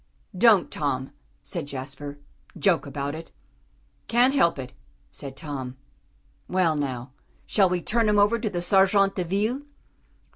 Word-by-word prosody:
"Don't, 205 Hz, -2 st, +5 dB
Tom," 135 Hz, -3 st, -2 dB, 0.3 s
said -, -, -4 dB
Jasper, 140 Hz, +1 st, -6 dB, 0.4 s
"joke 175 Hz, -6 st, +2 dB
about 140 Hz, +1 st, -3 dB
it." 165 Hz, +1 st, -8 dB, 0.8 s
"Can't 245 Hz, +3 st, +4 dB
help 170 Hz, -, +3 dB
it," 130 Hz, -2 st, -7 dB, 0.4 s
said 135 Hz, -2 st, -6 dB
Tom. 135 Hz, -5 st, -5 dB, 0.7 s
"Well, 180 Hz, -4 st, +2 dB
now, 130 Hz, -3 st, -3 dB, 0.3 s
shall 195 Hz, -3 st, +3 dB
we 180 Hz, -1 st, -1 dB
turn 230 Hz, -1 st, +2 dB
him 210 Hz, -, +3 dB
over 205 Hz, +3 st, +4 dB
to 215 Hz, -, -1 dB
the 175 Hz, -3 st, -3 dB
_sergents 195 Hz, +1 st, +4 dB
de 185 Hz, -, -2 dB
ville?" 210 Hz, +9 st, -1 dB
175 Hz, 140 wpm, -25 LUFS, 140-205 Hz, 0.8 s, Don't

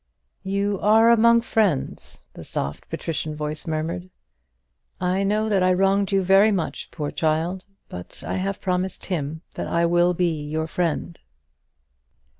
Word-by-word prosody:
"You 200 Hz, +1 st, -1 dB
are 220 Hz, +3 st, +5 dB
among 235 Hz, 0 st, +5 dB
friends," 210 Hz, -, -1 dB
the -, -, -10 dB
soft 70 Hz, +1 st, -5 dB
patrician 155 Hz, -1 st, -3 dB
voice 150 Hz, +1 st, -4 dB
murmured. 165 Hz, +3 st, -3 dB, 0.9 s
"I 185 Hz, +2 st, 0 dB
know 210 Hz, +2 st, +1 dB
that 200 Hz, -3 st, +2 dB
I 185 Hz, 0 st, +4 dB
wronged 195 Hz, +2 st, +2 dB
you 195 Hz, -1 st, +2 dB
very 195 Hz, +4 st, +5 dB
much, 185 Hz, -5 st, -3 dB
poor 150 Hz, -3 st, -4 dB
child; 165 Hz, +4 st, -1 dB, 0.2 s
but 90 Hz, 0 st, -10 dB
I -, -, -2 dB
have 195 Hz, +1 st, -2 dB
promised 185 Hz, 0 st, -2 dB
him 160 Hz, -2 st, -3 dB
that -, -, -4 dB
I 170 Hz, 0 st, +1 dB
will 175 Hz, +1 st, +3 dB
be 165 Hz, -4 st, 0 dB
your 155 Hz, +2 st, -2 dB
friend." 170 Hz, 0 st, -2 dB
180 Hz, 145 wpm, -23 LUFS, 160-195 Hz, 0.9 s, are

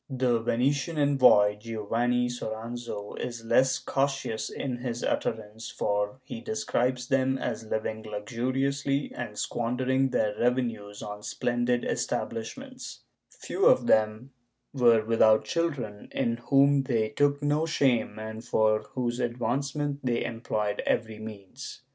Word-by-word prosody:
^ -, -, -3 dB
The 125 Hz, -2 st, +3 dB
Venitian 135 Hz, +7 st, 0 dB
envoy, 125 Hz, -8 st, +5 dB
Giovanni 115 Hz, +3 st, 0 dB
Soranzo 115 Hz, -2 st, -5 dB
is 120 Hz, -2 st, -5 dB
less 130 Hz, +2 st, +4 dB
cautious 135 Hz, -5 st, -1 dB
in 130 Hz, -3 st, -4 dB
his 120 Hz, -1 st, -4 dB
utterance, 110 Hz, 0 st, -2 dB
for 105 Hz, +4 st, -1 dB
he 155 Hz, -, -7 dB
describes 130 Hz, -, -1 dB
them 130 Hz, 0 st, +2 dB
as 115 Hz, -, -3 dB
living 110 Hz, 0 st, -2 dB
luxuriously 130 Hz, +6 st, -1 dB
and 115 Hz, -4 st, -6 dB
squandering 130 Hz, +3 st, 0 dB
their 105 Hz, -4 st, 0 dB
revenues 115 Hz, -5 st, -1 dB
on 105 Hz, 0 st, -6 dB
splendid 120 Hz, +2 st, 0 dB
establishments; 255 Hz, -, -4 dB, 0.3 s
few 395 Hz, +4 st, 0 dB
of -, -, +5 dB
them 110 Hz, -, +2 dB, 0.4 s
were 120 Hz, -5 st, +4 dB
without 110 Hz, -1 st, +4 dB
children, 140 Hz, -12 st, -2 dB
in 115 Hz, -3 st, 0 dB
whom 140 Hz, 0 st, +5 dB
they 115 Hz, -5 st, 0 dB
took 145 Hz, +5 st, +1 dB
no 150 Hz, +2 st, +1 dB
shame 130 Hz, -9 st, +1 dB
and 110 Hz, +1 st, -6 dB
for 110 Hz, -2 st, +2 dB
whose 120 Hz, -1 st, -1 dB
advancement 135 Hz, +5 st, -1 dB
they 120 Hz, -2 st, 0 dB
employed 110 Hz, -3 st, -2 dB
every 110 Hz, -2 st, -1 dB
means. 110 Hz, +5 st, -9 dB
120 Hz, 125 wpm, -28 LUFS, 110-135 Hz, 0.4 s, envoy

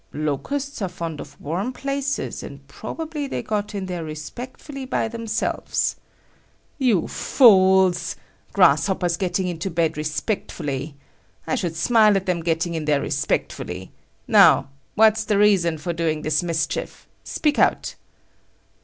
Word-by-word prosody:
"Locusts 230 Hz, -, -3 dB
are 190 Hz, -, -1 dB
fond 165 Hz, -3 st, -5 dB
of 145 Hz, 0 st, -12 dB
warm 180 Hz, -, -3 dB
places 275 Hz, +1 st, -3 dB
and -, -, -10 dB
probably 310 Hz, -3 st, -5 dB
they -, -, -4 dB
got 210 Hz, -1 st, -3 dB
in 195 Hz, -1 st, -3 dB
there 180 Hz, -3 st, -4 dB
respectfully 245 Hz, -, -8 dB
by 255 Hz, -3 st, -1 dB
themselves." 230 Hz, -1 st, -2 dB, 0.8 s
"You 235 Hz, -, +2 dB
fools! 190 Hz, -7 st, +4 dB, 0.4 s
Grasshoppers 180 Hz, 0 st, +3 dB
getting 185 Hz, +1 st, -1 dB
into 175 Hz, +1 st, -3 dB
bed 165 Hz, -2 st, 0 dB
respectfully! 150 Hz, -, -3 dB, 0.5 s
I -, -, -2 dB
should 175 Hz, -10 st, -1 dB
smile 215 Hz, +3 st, +4 dB
at 190 Hz, -, -3 dB
them 180 Hz, -2 st, 0 dB
getting 165 Hz, +1 st, -1 dB
in 160 Hz, -2 st, -3 dB
there 150 Hz, -2 st, +2 dB
respectfully! 90 Hz, +1 st, -2 dB, 0.4 s
Now, -, -, +6 dB, 0.3 s
what's 220 Hz, 0 st, +5 dB
the 215 Hz, -2 st, +1 dB
reason 190 Hz, -6 st, +3 dB
for 170 Hz, +3 st, -3 dB
doing 160 Hz, -2 st, -1 dB
this 155 Hz, -1 st, +1 dB
mischief? 160 Hz, -2 st, -3 dB, 0.2 s
Speak 300 Hz, -2 st, 0 dB
out." -, -, +2 dB
180 Hz, 130 wpm, -23 LUFS, 160-220 Hz, 0.8 s, Now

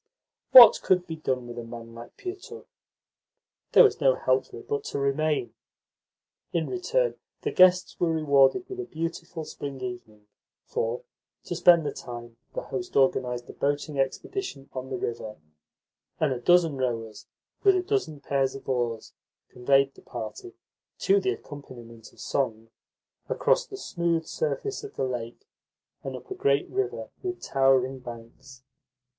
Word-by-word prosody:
What 245 Hz, -3 st, +10 dB
could 180 Hz, -1 st, +2 dB
be 160 Hz, -2 st, -6 dB
done 130 Hz, -5 st, -2 dB
with 120 Hz, 0 st, -7 dB
a -, -, -5 dB
man 115 Hz, 0 st, -9 dB
like 115 Hz, 0 st, -12 dB
Pietukh? 400 Hz, +4 st, -8 dB, 1.1 s
There -, -, +9 dB
was 425 Hz, -, +3 dB
no 135 Hz, -2 st, +5 dB
help 130 Hz, +1 st, +1 dB
for -, -, -11 dB
it -, -, -12 dB
but 140 Hz, -, -2 dB
to -, -, -4 dB
remain. 140 Hz, 0 st, 0 dB, 1.0 s
In 165 Hz, -2 st, 0 dB
return, 480 Hz, +7 st, 0 dB, 0.3 s
the -, -, -1 dB
guests 185 Hz, 0 st, +4 dB
were 170 Hz, -2 st, +2 dB
rewarded 150 Hz, -, +3 dB
with 380 Hz, -1 st, -7 dB
a 375 Hz, -, -3 dB
beautiful 165 Hz, -, -5 dB
spring 140 Hz, -3 st, -7 dB
evening, 120 Hz, -4 st, -7 dB, 0.4 s
for, 115 Hz, +2 st, -2 dB, 0.4 s
to 175 Hz, -, -4 dB
spend 170 Hz, -2 st, +6 dB
the -, -, -1 dB
time, 120 Hz, -1 st, -9 dB, 0.2 s
the -, -, -3 dB
host 180 Hz, -4 st, -4 dB
organised 125 Hz, -2 st, +1 dB
a -, -, -17 dB
boating 145 Hz, 0 st, -2 dB
expedition 135 Hz, -, -3 dB
on 130 Hz, 0 st, -5 dB
the 130 Hz, -, -3 dB
river, 115 Hz, -3 st, -4 dB, 0.8 s
and 150 Hz, -4 st, +2 dB
a 125 Hz, -, -5 dB
dozen 165 Hz, -1 st, +4 dB
rowers, 115 Hz, -4 st, -3 dB, 0.4 s
with 395 Hz, -2 st, +6 dB
a 370 Hz, -, +1 dB
dozen 370 Hz, -, -2 dB
pairs 135 Hz, -1 st, 0 dB
of 135 Hz, -, -10 dB
oars, 120 Hz, -4 st, -2 dB, 0.4 s
conveyed 135 Hz, +2 st, +2 dB
the -, -, -17 dB
party 120 Hz, -, -7 dB, 0.4 s
(to 400 Hz, +1 st, +3 dB
the 385 Hz, 0 st, 0 dB
accompaniment 120 Hz, -6 st, -11 dB
of -, -, -22 dB
song) 115 Hz, -4 st, -2 dB, 0.6 s
across -, -, +2 dB
the 395 Hz, -, -8 dB
smooth 170 Hz, -, -1 dB
surface 440 Hz, -3 st, -3 dB
of 420 Hz, -, -9 dB
the -, -, -1 dB
lake 120 Hz, -2 st, -5 dB, 0.6 s
and 135 Hz, -1 st, -5 dB
up 130 Hz, -, -11 dB
a -, -, 0 dB
great 140 Hz, +1 st, +1 dB
river 400 Hz, +1 st, -2 dB
with 365 Hz, -2 st, -4 dB
towering 135 Hz, -1 st, +2 dB
banks. 125 Hz, +2 st, -11 dB
140 Hz, 155 wpm, -27 LUFS, 125-175 Hz, 1.1 s, What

